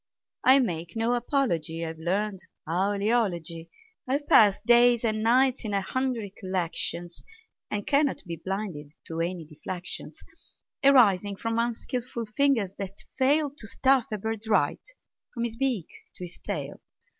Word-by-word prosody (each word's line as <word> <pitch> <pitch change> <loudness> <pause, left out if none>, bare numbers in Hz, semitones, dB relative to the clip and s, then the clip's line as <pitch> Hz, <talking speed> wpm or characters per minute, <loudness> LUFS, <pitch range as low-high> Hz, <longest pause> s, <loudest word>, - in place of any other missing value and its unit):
I 260 +1 +7
make 175 -10 -2
no 225 +2 +1
apology; 175 - -1
I've 160 0 -6
learned 195 +4 -1 0.3
owl 190 +5 0
eology. 175 -7 -1 0.4
I've 280 +3 -1
passed 205 -2 +5
days 240 0 +5
and 215 -1 0
nights 255 +3 +3
in 210 -2 -2
a 195 - +2
hundred 230 -2 -2
collections, 175 -2 -3 0.5
And 205 -1 -3
cannot 285 -1 +2
be 170 -2 -5
blinded 185 -7 -5
to 165 0 -5
any 170 0 -2
deflections 175 +4 -7 0.7
Arising 205 -8 +5
from 230 +3 -2
unskilful 235 0 -3
fingers 220 -3 +1
that 195 0 -5 0.2
fail 285 +2 +2
To 275 -6 -7
stuff 265 +3 +3
a 215 - -1
bird 220 +1 -4
right, 190 -10 +2 0.5
from 235 - -2
his 235 -1 -3
beak 245 -8 0 0.3
to - - -8
his 175 - -11
tail. - - -5
215 Hz, 145 wpm, -27 LUFS, 180-245 Hz, 0.7 s, I